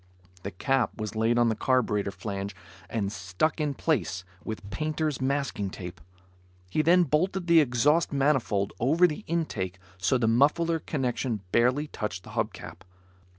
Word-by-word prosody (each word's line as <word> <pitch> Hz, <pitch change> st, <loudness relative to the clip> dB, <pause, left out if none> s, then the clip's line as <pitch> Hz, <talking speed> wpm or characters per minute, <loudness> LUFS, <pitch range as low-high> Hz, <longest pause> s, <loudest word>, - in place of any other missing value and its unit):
The 95 Hz, -, -4 dB
cap 130 Hz, +6 st, 0 dB
was 110 Hz, 0 st, -4 dB
laid 115 Hz, +2 st, +2 dB
on 120 Hz, -1 st, +4 dB
the 110 Hz, -, 0 dB
carburetor 110 Hz, -4 st, +1 dB
flange 100 Hz, -1 st, -5 dB, 0.3 s
and 100 Hz, -3 st, -1 dB
stuck 100 Hz, -, -1 dB
in 145 Hz, -2 st, -1 dB
place 95 Hz, -, 0 dB, 0.2 s
with 110 Hz, -3 st, -6 dB
painter's 155 Hz, +4 st, -2 dB
masking 135 Hz, -7 st, -1 dB
tape. 90 Hz, -4 st, -8 dB, 0.7 s
He 155 Hz, -, +2 dB
then 175 Hz, +3 st, +5 dB
bolted 175 Hz, +5 st, 0 dB
the 170 Hz, -1 st, +6 dB
exhaust 145 Hz, +4 st, +3 dB
manifold 135 Hz, -8 st, +1 dB
over 155 Hz, +9 st, +4 dB
the 175 Hz, +4 st, -1 dB
intake 105 Hz, -, -2 dB, 0.2 s
so 95 Hz, +8 st, +2 dB
the 115 Hz, -2 st, +1 dB
muffler 150 Hz, +8 st, +3 dB
connection 125 Hz, -, -2 dB
barely 125 Hz, +5 st, +3 dB
touched 100 Hz, -, -5 dB
the -, -, -11 dB
hub -, -, -1 dB
cap. -, -, -10 dB
125 Hz, 150 wpm, -27 LUFS, 100-150 Hz, 0.7 s, the